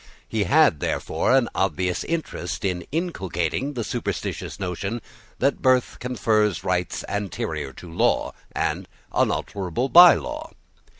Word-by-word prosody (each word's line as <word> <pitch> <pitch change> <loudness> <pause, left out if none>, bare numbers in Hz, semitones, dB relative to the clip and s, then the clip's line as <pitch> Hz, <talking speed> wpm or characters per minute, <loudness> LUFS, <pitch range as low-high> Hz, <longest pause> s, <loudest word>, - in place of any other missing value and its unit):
He 110 -2 0
had, 145 - +4
therefore, - - -1
an 125 -3 +2
obvious 90 -1 0
interest 160 - -3
in 90 -3 -2
inculcating 135 - -2
the 120 - -2
superstitions - - -4
notion 95 +4 -3 0.4
that 140 +2 +1
birth 130 -2 +2
confers 110 -7 +1
rights 90 -2 -1
anterior 80 -8 -3
to 90 - -11
law, - - +1 0.2
and - - -2 0.3
unalterable 100 +7 -1
by 175 +2 +10
law. 305 +2 -6
105 Hz, 120 wpm, -24 LUFS, 90-135 Hz, 0.4 s, by